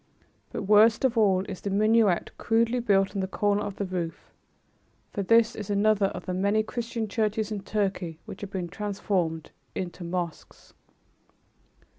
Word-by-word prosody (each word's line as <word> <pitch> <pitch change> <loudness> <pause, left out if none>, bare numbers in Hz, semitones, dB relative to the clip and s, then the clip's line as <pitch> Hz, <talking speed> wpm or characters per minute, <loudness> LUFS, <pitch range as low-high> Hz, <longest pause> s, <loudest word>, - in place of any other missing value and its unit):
But, - - -4
worst 215 +5 +5
of 250 -2 +2
all, 195 -4 +3
is 190 - -7
the 200 - -3
minaret 215 -1 +3
crudely 230 +2 +2
built 195 -4 +2
on 200 - -2
the 190 - -1
corner 205 +1 +1
of 205 -1 -4
the 200 - -3
roof, 175 -3 -5 0.8
for 200 - -3
this 230 +3 +4
is 210 -1 -6
another 205 0 +3
of - - -7
the 185 - -3
many 200 +4 +2
Christian 230 0 -4
churches 215 0 -1
in 210 - -2
Turkey 195 -5 -2
which - - -9
have 205 - -5
been 190 -3 -3
transformed 190 -5 -2 0.2
into 180 -1 -5
mosques. 170 -1 -5
205 Hz, 160 wpm, -27 LUFS, 190-220 Hz, 0.8 s, worst